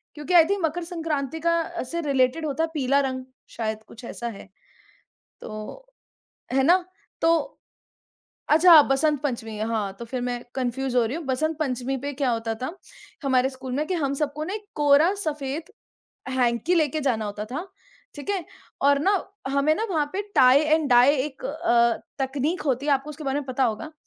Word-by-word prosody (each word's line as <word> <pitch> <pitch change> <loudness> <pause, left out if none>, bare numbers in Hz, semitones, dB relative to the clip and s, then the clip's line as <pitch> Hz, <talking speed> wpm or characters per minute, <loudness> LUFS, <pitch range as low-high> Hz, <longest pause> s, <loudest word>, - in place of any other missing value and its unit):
क्योंकि 300 +4 -4
I 340 -2 +9
think 400 -2 0
Makar 330 +3 -2
Sankranti 320 -4 -3
का 335 +1 0
से 335 +7 -4
रिलेटेड 275 +1 +1
होता 300 +2 -1
है 325 - -1
पीला 275 -2 +2
रंग, 260 -1 -3 0.3
शायद 220 -1 -4
कुछ 235 - -13
ऐसा 235 - -5
है 215 -4 -9 0.9
तो, 215 - -8 0.7
है 270 0 +3
ना? 345 +6 +6 0.4
तो 330 -3 +1 0.9
अच्छा 325 +1 +8
बसंत 290 +1 +1
पंचमी 230 -6 -3
हाँ, 215 -3 -1
तो 235 - -6
फिर 250 +2 -4
मैं 245 0 -3
कन्फ्यूज़ 260 0 -2
हो 245 - +4
रही 250 +7 -3
हूँ। 335 - -6
बसंत 310 +5 0
पंचमी 265 -3 -1
पे 285 +2 -4
क्या 270 -2 0
होता 225 -1 -1
था, 325 +8 -4 0.5
हमारे 260 -1 +3
स्कूल 260 -1 -8
में 300 +3 -1
कि 370 - -1
हम 280 -5 0
सबको 295 +1 -2
ना 375 - -4
एक 425 -1 -7
कोरा 295 +4 +4
सफ़ेद 300 +3 -4 0.6
हैंकी 255 +6 +1
लेके 310 -2 +1
जाना 245 -6 0
होता 205 0 -4
था, 280 - -5 0.5
ठीक 290 +6 -5
है? 385 -4 -1 0.4
और 280 0 +5
ना, 385 +7 +3 0.4
हमें 280 +3 +2
ना 435 - -2
वहाँ 310 -5 +1
पे 395 - -2
टाइ 255 +1 +7
एंड 310 -1 +2
डाई 250 +4 +6
एक 265 0 -4
अ, 250 -6 +2 0.3
तकनीक 285 +6 -2
होती 275 -1 -1
है 295 - +3
आपको 275 +2 0
उसके 300 +1 -9
बारे 275 +1 0
में 280 - -9
पता 260 0 0
होगा 240 +7 -3
280 Hz, 185 wpm, -25 LUFS, 255-315 Hz, 0.9 s, I